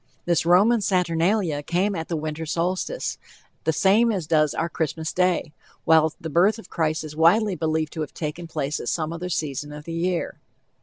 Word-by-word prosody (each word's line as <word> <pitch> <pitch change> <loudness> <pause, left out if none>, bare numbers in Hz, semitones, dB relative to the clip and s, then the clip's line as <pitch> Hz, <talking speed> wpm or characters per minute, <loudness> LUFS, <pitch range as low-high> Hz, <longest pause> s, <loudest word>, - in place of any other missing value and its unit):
This 170 -1 +1
Roman 210 +6 +5
Saturnalia 180 -3 +1
came 180 +7 0
at 165 -3 -4
the 170 - -2
winter 155 0 -4
solstice, 180 - -2 0.5
the 160 - +3
same 205 +8 +3
as 190 -6 -2
does 155 -1 +2
our 165 - 0
Christmas 160 -1 -3
day, 180 -4 +1 0.3
while 160 -1 +5
the 165 - -6
birth 180 +8 +3
of 225 - -13
Christ 155 -2 0
is 150 -1 -8
widely 185 +6 +4
believed 155 -1 -1
to 160 - -4
have 150 - -4
taken 165 +2 -5
place 150 -2 -2
at - - -3
some 160 -1 -2
other 175 +2 -5
season 150 -3 -3
of 150 0 -8
the 165 - -7
year. 175 +1 -2
165 Hz, 190 wpm, -24 LUFS, 155-180 Hz, 0.5 s, Roman